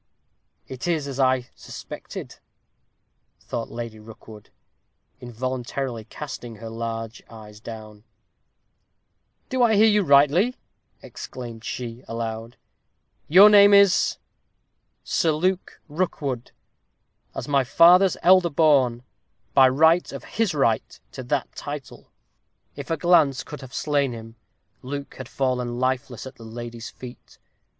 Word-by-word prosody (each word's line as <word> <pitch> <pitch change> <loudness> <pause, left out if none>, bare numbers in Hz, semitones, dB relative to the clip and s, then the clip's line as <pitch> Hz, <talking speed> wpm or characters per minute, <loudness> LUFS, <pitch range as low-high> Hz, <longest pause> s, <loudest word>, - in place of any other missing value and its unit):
"Soh! - - -8
it 130 +6 -6
is 160 -5 -1
as 135 -1 -6
I 130 -2 +2
suspected," - - -9 1.0
thought 115 - -5
Lady 115 -2 -7
Rookwood, 110 -1 -14 0.7
involuntarily 125 -1 -4
casting 120 -2 -8
her 115 +1 -9
large 115 0 -5
eyes 105 -2 -13
down. 110 -2 -10 1.5
"Do 260 -1 -1
I 230 -3 +4
hear 210 +2 +6
you 210 -1 +4
rightly?" 150 - +4 0.5
exclaimed 115 -3 -9
she, 120 0 -6
aloud; 115 +1 -5 0.7
"your 190 +6 +8
name 205 -1 +7
is 200 -2 +4 0.4
" - - -50
"Sir 160 -2 +1
Luke 185 +4 -2
Rookwood. 145 -6 -3 0.9
As - - -5
my 140 -2 +2
father's 175 +8 +5
elder 185 -1 +5
born; 135 -6 +2 0.5
by 135 -2 +6
right 160 +6 +3
of - - -8
his 225 -7 -2
right 115 -6 0
to - - -8
that - - -2
title." - - -8 0.7
If - - -8
a 165 - 0
glance 155 -5 +3
could - - -10
have 130 -2 -11
slain 140 -4 0
him, 115 0 -10 0.5
Luke 140 +2 -6
had 130 - -8
fallen 125 -2 -2
lifeless 130 -1 -2
at 130 0 -11
the 115 - -13
lady's 115 +1 -8
feet. 125 -1 -13
130 Hz, 125 wpm, -23 LUFS, 115-160 Hz, 1.5 s, your